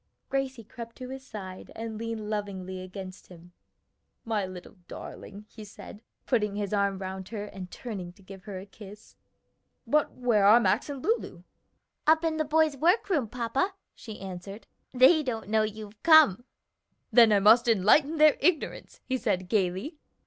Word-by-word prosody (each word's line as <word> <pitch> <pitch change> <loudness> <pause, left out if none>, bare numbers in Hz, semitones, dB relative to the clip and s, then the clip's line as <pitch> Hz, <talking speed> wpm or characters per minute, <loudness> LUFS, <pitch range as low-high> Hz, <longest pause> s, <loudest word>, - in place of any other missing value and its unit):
Gracie 265 -3 -2
crept 230 +1 -10
to 255 -1 -8
his 265 0 -8
side 190 -7 -9
and 225 0 -6
leaned 225 -2 -5
lovingly 190 -3 -4
against 185 0 -9
him. 175 -1 -15 0.7
"My 215 -4 -1
little 185 +1 -11
darling," 205 +2 -10
he 220 - -12
said, 205 0 -12 0.2
putting 210 -5 0
his 205 -1 -3
arm 200 -1 +1
round 190 0 -6
her 210 -2 -5
and 190 -3 -9
turning 195 -7 -7
to 195 - -21
give 190 0 -12
her 200 -3 -6
a 185 - -8
kiss. 205 +1 -14 0.7
"But 300 0 +1
where 240 -5 +1
are 220 +3 +8
Max 195 +5 +1
and 275 -3 -6
Lulu?" 400 - -2 0.6
"Up 320 +1 +5
in 320 -1 0
the 310 - 0
boys' 310 0 +2
work 365 - +2
room, 285 -10 +1
papa," 250 - -2 0.2
she 220 -3 -10
answered. 195 +2 -8 0.3
"They 260 +6 +6
don't 230 -7 -4
know 220 0 +3
you've 215 -1 -6
come." 310 - +6 0.7
"Then 230 -3 +7
I 205 - +5
must 225 +5 +6
enlighten 235 - +4
their 305 -1 +6
ignorance," 345 -5 -1
he 260 -1 -2
said 180 -4 -1
gayly. 200 - -1
215 Hz, 165 wpm, -28 LUFS, 195-260 Hz, 0.7 s, are